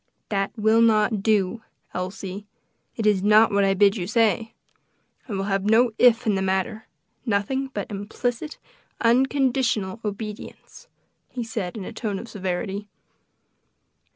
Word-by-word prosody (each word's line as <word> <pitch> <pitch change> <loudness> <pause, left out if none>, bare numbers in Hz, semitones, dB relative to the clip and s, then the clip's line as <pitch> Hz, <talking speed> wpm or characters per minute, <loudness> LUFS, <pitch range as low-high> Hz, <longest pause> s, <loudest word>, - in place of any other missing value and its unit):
"That 195 -1 -1
will 220 +1 +4
not 215 -2 +3
do, 210 0 +1 0.3
Elsie; 190 +2 -5 0.5
it 220 - -3
is 205 -3 +3
not 215 +3 +5
what 200 0 +3
I 195 0 +2
bid 200 +2 +4
you 180 -2 -3
say. 225 0 +1 0.7
I - - -3
will 195 0 -1
have 195 -1 -1
no 225 +3 +4
if 245 -1 +5
in 215 - +2
the 190 - 0
matter; 190 +4 -1 0.4
nothing 245 +5 -1
but 210 -7 -6
implicit, 235 +8 -4 0.4
unconditional 245 -4 +1
obedience," 210 0 -7 0.4
he 245 - -4
said 220 -4 -4
in 195 - -6
a - - -7
tone 215 -3 -3
of 230 - -8
severity. 200 0 -4
210 Hz, 140 wpm, -24 LUFS, 195-230 Hz, 0.7 s, not